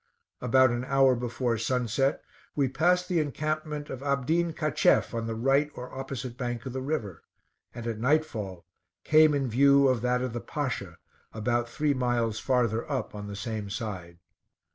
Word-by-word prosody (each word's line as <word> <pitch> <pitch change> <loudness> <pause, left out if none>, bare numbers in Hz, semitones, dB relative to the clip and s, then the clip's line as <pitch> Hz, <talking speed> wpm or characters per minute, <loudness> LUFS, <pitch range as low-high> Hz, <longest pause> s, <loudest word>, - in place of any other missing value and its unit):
About 130 +1 +4
an 120 +1 -2
hour 135 0 +4
before 120 -1 -2
sunset, 125 +3 0 0.3
we 140 -2 +2
passed 180 +7 +2
the 180 -3 +1
encampment 155 0 -2
of 130 - -6
Abdin 145 +5 +1
Cacheff, 155 -5 +2
on 115 -1 -2
the 115 - -3
right 135 +5 +2
or 125 +1 -8
opposite 130 -2 -5
bank 120 -2 -3
of 130 - -5
the 130 - -3
river; 125 - -3 0.5
and 120 -1 -7
at 115 -2 -3
night 150 +6 +3
fall 95 - -7 0.4
came 155 -1 +5
in 135 -2 0
view 140 +3 +5
of 130 -4 +1
that 125 +1 +1
of 125 -2 -3
the 120 - -4
Pasha 115 - -4 0.4
about 120 +2 -1
three 150 +3 0
miles 120 -4 0
farther 120 -1 0
up 135 - -2
on 105 -1 -7
the 100 - -6
same 105 0 -4
side. 95 -6 -5
125 Hz, 170 wpm, -28 LUFS, 115-140 Hz, 0.5 s, came